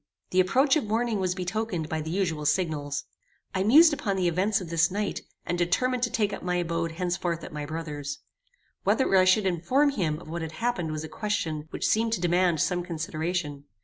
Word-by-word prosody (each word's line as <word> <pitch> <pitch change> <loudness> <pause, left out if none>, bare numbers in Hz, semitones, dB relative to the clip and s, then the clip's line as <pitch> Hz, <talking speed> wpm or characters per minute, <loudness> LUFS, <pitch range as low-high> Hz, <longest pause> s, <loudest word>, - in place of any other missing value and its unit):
The 185 - +2
approach 260 - +4
of 310 - 0
morning 225 0 0
was 185 -1 0
betokened 185 -2 -2
by 160 0 -2
the 155 - -5
usual 165 -5 -1
signals. 145 -4 0 0.5
I 190 - 0
mused 295 - +7
upon 215 -9 -1
the 185 -2 +1
events 195 +5 +1
of 175 -3 -8
this 165 -1 +3
night, 205 +2 -2 0.2
and 175 - -2
determined 245 +9 +1
to 240 - +1
take 210 -3 0
up - - -5
my 180 0 -1
abode 165 -1 -1
henceforth 175 -1 -2
at - - -8
my 150 -1 -4
brother's. 145 -3 -5 0.7
Whether 265 -8 +2
I 185 -1 +6
should 190 +2 +4
inform 190 - +2
him 165 - -1
of - - -13
what 170 +2 -4
had 160 0 -5
happened 225 -5 -1
was 155 0 -4
a - - -5
question 160 -5 -3
which - - -3
seemed 225 +1 +2
to 225 - 0
demand 175 -2 +2
some 180 -1 +1
consideration. 160 -3 -3
180 Hz, 205 wpm, -27 LUFS, 160-210 Hz, 0.7 s, mused